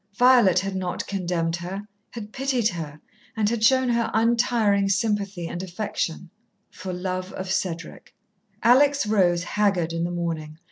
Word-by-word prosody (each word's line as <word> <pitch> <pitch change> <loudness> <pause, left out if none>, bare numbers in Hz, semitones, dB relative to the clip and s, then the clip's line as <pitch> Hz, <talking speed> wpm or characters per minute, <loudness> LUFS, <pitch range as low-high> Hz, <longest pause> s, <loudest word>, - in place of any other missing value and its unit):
Violet 245 -6 +5
had 195 0 -4
not 185 -1 -3
condemned 175 -4 -1
her, 190 +4 -6 0.2
had 215 -2 -9
pitied 255 -4 +1
her, 155 -4 -7 0.4
and 215 -1 +2
had 225 0 -1
shown 260 +2 +4
her 235 -1 +1
untiring 225 -3 +2
sympathy 200 -3 -1
and 175 - -5
affection 180 -2 -4 0.4
for 185 0 -7
love 185 +1 -4
of 185 0 -5
Cedric. 170 -4 -4 0.5
Alex 280 +4 +5
rose 180 -5 +2
haggard, 190 -5 0
in 165 0 -1
the 170 - -1
morning. 165 -3 -4
195 Hz, 145 wpm, -24 LUFS, 175-225 Hz, 0.5 s, Violet